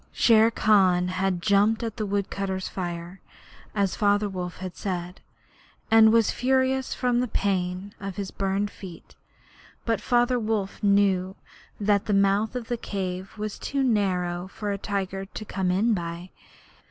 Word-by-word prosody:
Shere 225 -1 +5
Khan 190 -5 +3
had 185 -1 -1
jumped 210 +3 +3
at 225 0 -5
a 215 - -1
woodcutters' 195 -1 -2
camp - - -19
fire, 175 0 -5 0.5
as 200 -2 +1
Father 205 0 +2
Wolf 180 -2 -5
had 185 -2 -7
said, 180 -2 -5 0.7
and 220 0 +7
was 230 -1 +4
furious 260 +1 +1
from 245 -1 +1
the 250 - 0
pain 190 -1 -2
of 195 -2 -6
his 195 -1 -5
burned 195 +1 -1
feet. 180 -4 -11 0.7
But 230 -1 0
Father 245 0 +2
Wolf 215 -3 -2
knew 200 -2 +2 0.4
that 205 -1 +1
the 210 - +2
mouth 200 +3 +2
of 240 -2 -4
the 240 - -2
cave 190 -2 -5
was 210 -1 -5
too 275 -1 -1
narrow 185 -6 0
for 205 +1 -5
a 200 - -2
tiger 195 -1 -3
to 215 +2 -8
come 190 -2 -2
in 210 +6 +2
by. 170 -1 -5
200 Hz, 155 wpm, -25 LUFS, 185-220 Hz, 0.7 s, and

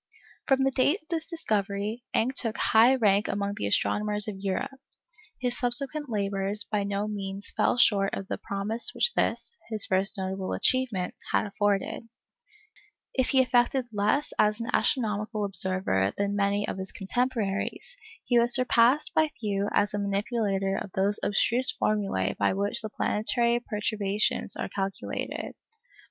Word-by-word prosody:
From 270 -1 +3
the 270 - +2
date 285 +9 +1
of 315 - -38
this 325 -2 -3
discovery, 215 - -2
Encke 250 +4 +1
took 230 -4 -1
high 230 +4 +5
rank 210 -4 +2
among 200 0 -2
the 100 - -2
astronomers 210 - +1
of 200 -3 -5
Europe. 235 +8 -3 0.6
His 245 -1 -2
subsequent 275 +4 +1
labours 200 -1 -1
by 210 -1 -2
no 200 +1 -2
means 200 -1 -5
fell - - +2
short 200 -5 +3
of 195 - -6
the - - -4
promise 215 - -3
which 480 - +3
this, 470 - -2
his 220 -2 -2
first 195 +3 +1
notable 190 0 -3
achievement, 245 -9 0 0.2
had - - +2
afforded. 205 +2 -1 1.0
If 260 -1 +1
he 265 -1 +4
effected 245 0 +1
less 210 +8 0
as 210 +1 +3
an 230 - -4
astronomical 215 -3 0
observer 185 - +2
than 200 0 -1
many 200 0 0
of - - -4
his 190 0 -5
contemporaries, 225 - -2 0.3
he 240 -1 +3
was 240 +1 +4
surpassed 250 +3 +4
by 315 -1 +3
few 205 -2 -1
as 205 - +1
a 205 - -1
manipulator 200 -1 -1
of - - -5
those 200 +2 0
abstruse 240 +5 +2
formulæ 210 -2 0
by - - +1
which 200 +1 +2
the 215 - -5
planetary 235 +3 +1
perturbations 210 -3 -1
are - - -3
calculated. 195 0 -4
210 Hz, 150 wpm, -27 LUFS, 200-245 Hz, 1.0 s, high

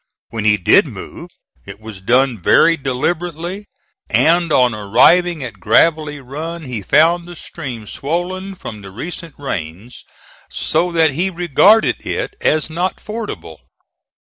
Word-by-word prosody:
When 110 -2 -4
he 105 -1 +4
did 90 - +4
move - - -9 0.3
it 100 +1 -11
was 110 -3 -10
done 125 +1 +2
very 165 - +4
deliberately, 170 +7 -3 0.4
and 170 0 +3
on 125 -4 +3
arriving 155 - +3
at 110 -6 -8
Gravelly 150 - +2
Run 160 +6 -7
he 125 -6 -5
found 165 - +3
the 175 - -10
stream 125 -8 -7
swollen 180 - -4
from 110 - -9
the 100 - -10
recent 165 - -8
rains 100 - -6 0.5
so 180 0 0
that 160 -2 +3
he 175 +8 -1
regarded 180 +5 +3
it - - -3
as 155 0 +1
not 175 +4 -3
fordable. 155 - -7
150 Hz, 135 wpm, -17 LUFS, 115-175 Hz, 0.5 s, he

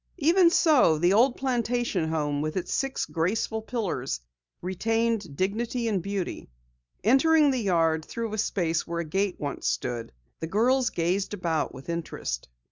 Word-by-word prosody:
Even 340 +3 +5
so, 295 - +4
the 175 +4 +3
old 245 +4 +4
plantation 240 -8 0
home 145 -2 -1
with 155 +3 -2
its 180 -1 -2
six 270 0 -1
graceful 210 +6 -1
pillars, 215 - -3 0.4
retained 220 -1 -1
dignity 230 - -1
and 200 -5 0
beauty. 200 0 -4 0.5
Entering 290 - +5
the 260 - 0
yard 165 -5 +2
through 230 +4 -5
a 215 - -2
space 170 -6 0
where 170 0 -2
a - - -5
gate 190 +4 0
once 145 -1 -3
had - - +3
stood, 120 -2 -5 0.3
the 160 - -4
girls 240 +7 +2
gazed 185 +5 -1
about 165 -7 -1
with 130 - -11
interest. 160 - -4
200 Hz, 155 wpm, -27 LUFS, 165-235 Hz, 0.5 s, Even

